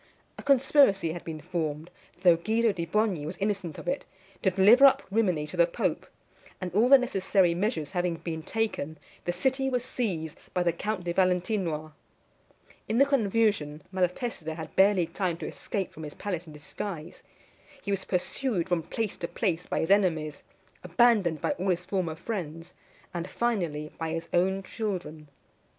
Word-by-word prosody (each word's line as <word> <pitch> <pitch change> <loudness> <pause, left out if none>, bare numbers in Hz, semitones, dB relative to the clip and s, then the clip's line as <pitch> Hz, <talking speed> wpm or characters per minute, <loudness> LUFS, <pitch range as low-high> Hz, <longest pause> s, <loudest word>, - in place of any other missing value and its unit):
A - - -9
conspiracy 265 - +4
had 175 - -7
been 160 -2 -6
formed, 160 -1 -3 0.3
though 175 -2 +7
Guido 220 +6 +1
di 170 -4 -4
Bogni 205 -4 +1
was 160 +5 -5
innocent 195 -6 -2
of - - -9
it, 275 - -1 0.4
to - - +3
deliver 200 +8 +6
up 270 - +3
Rimini 185 -8 +1
to 155 +4 -8
the 170 0 +5
pope; 170 - -2 0.5
and 180 -2 -5
all 225 +6 +4
the 275 - +10
necessary 195 -7 +2
measures 180 - -1
having 175 -2 0
been 165 -1 -5
taken, 160 -6 -2 0.3
the 175 - +1
city 265 +9 0
was 250 -1 -1
seized 185 - -3 0.2
by 180 - +2
the 170 -1 +2
Count 205 +2 -3
de 175 0 -2
Valentinois. 180 -4 0 1.0
In 220 - +1
the 275 - +6
confusion, 210 - +1
Malatesta 180 -2 -2
had 160 -1 -8
barely 190 -2 +5
time 170 0 -2
to - - -6
escape 195 -5 -4
from 160 - -10
his 150 -1 -7
palace 180 -4 -4
in 155 - -10
disguise. 155 +2 -7 0.6
He 200 - -3
was 195 -1 -1
pursued 185 0 -1
from 175 -2 +2
place 210 +5 -3
to 170 - -4
place 180 -5 -1
by - - -1
his 160 - 0
enemies, 160 -7 +2 0.4
abandoned 180 -3 +3
by - - +1
all 190 - 0
his 180 0 0
former 180 -5 -1
friends, 165 -4 -5 0.4
and, 175 +1 -4
finally, 170 -11 -1
by 165 -1 -2
his 165 0 -4
own 190 +2 +2
children. 180 -8 -4
180 Hz, 170 wpm, -28 LUFS, 165-210 Hz, 1.0 s, the